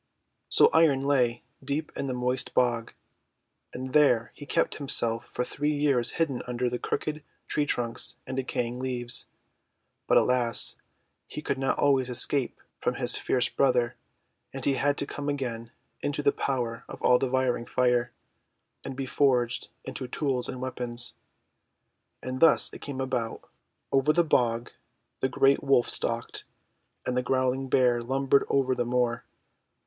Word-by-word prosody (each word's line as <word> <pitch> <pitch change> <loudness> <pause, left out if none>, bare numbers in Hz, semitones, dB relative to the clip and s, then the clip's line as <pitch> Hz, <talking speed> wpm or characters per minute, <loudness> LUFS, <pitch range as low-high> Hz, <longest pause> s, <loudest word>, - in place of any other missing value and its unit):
So - - +6
Iron 155 -5 +4
lay 125 -4 +1 0.2
deep 145 +3 -2
in 140 - -3
the 130 - -2
moist 125 +1 -2
bog, 120 -2 +1 0.8
and 130 0 -6
there 125 -6 +4
he 145 - -11
kept - - 0
himself 115 -5 +1
for 125 - -3
three 150 +4 -1
years 140 -5 +2
hidden 150 -6 0
under 125 0 -1
crooked 155 0 -3 0.3
tree 145 -1 0
trunks 120 -3 0
and 130 - -5
decaying 125 -2 -2
leaves. 125 -2 -2 0.8
But, - - +5
alas! 125 -2 +3 0.5
he 150 - -7
could 135 -2 -2
not 135 - 0
always 135 -3 +2
escape 130 +2 +1 0.2
from - - -1
his - - +2
fierce 125 -1 +2
brother, 125 -3 +1 0.6
and 135 -1 -6
he 140 - +3
had 145 +1 +1
to - - -2
come 145 0 -5
again 120 -5 -3 0.3
into 145 0 -2
the 140 - +4
power 120 -4 -2
of - - -8
all 125 0 +5
devouring 130 -2 0
Fire, 125 -1 +1 0.7
and 135 - -6
be 135 0 -3
forged 125 -3 +1 0.2
into 130 0 -6
tools 130 -1 -2
and 130 - -5
weapons. 120 -2 -3 1.1
And 130 0 -4
thus 165 -1 +4
it - - -10
came 135 -2 -5
about: 125 -4 -3 0.2
— - - -51
Over 135 +3 +3
the 175 - +4
bog 120 -6 +1 0.5
the 130 - 0
great 135 +2 +3
WTolf 135 -3 +3
stalked, - - -2 0.6
and 125 - -1
the 125 - +2
growling 130 +1 0
Bear 125 -2 +3
lumbered 135 +3 +2
over 135 -2 +2
the 120 - 0
moor. 120 -1 0
130 Hz, 155 wpm, -27 LUFS, 120-140 Hz, 1.1 s, So